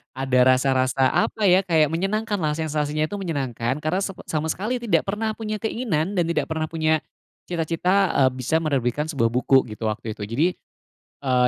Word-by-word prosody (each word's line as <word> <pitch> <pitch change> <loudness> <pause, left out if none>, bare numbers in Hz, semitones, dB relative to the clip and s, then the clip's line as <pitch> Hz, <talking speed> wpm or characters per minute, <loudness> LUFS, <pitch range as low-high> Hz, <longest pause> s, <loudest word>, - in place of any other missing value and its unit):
ada 130 -1 0
rasa 130 +1 +4
rasa 130 +1 +2
apa 215 -2 +1
ya, 185 +1 +5
kayak 160 -4 +3
menyenangkan 195 +7 -1
lah. 150 - +1
Sensasinya 155 -1 -1
itu 205 - -7
menyenangkan 135 - -2
karena 170 +6 -1
sepe 195 -2 -6
sama 160 0 -1
sekali 235 +8 -2
tidak 225 - +1
pernah 215 +2 -1
punya 215 -2 -4
keinginan 200 -6 -1
dan 170 - +2
tidak 170 - -1
pernah 160 0 -1
punya 155 -1 +1 0.5
cita 170 -2 -2
cita, 170 +4 0 0.3
eee, - - +3
bisa 130 +5 0
menerbitkan 145 -2 -1
sebuah 130 -8 0
buku 130 +2 +3
gitu 110 +1 -5
waktu 110 0 -4
itu. - - -6
Jadi, 130 +10 +1 0.8
eee, 125 -1 +3
155 Hz, 185 wpm, -23 LUFS, 130-185 Hz, 0.8 s, ya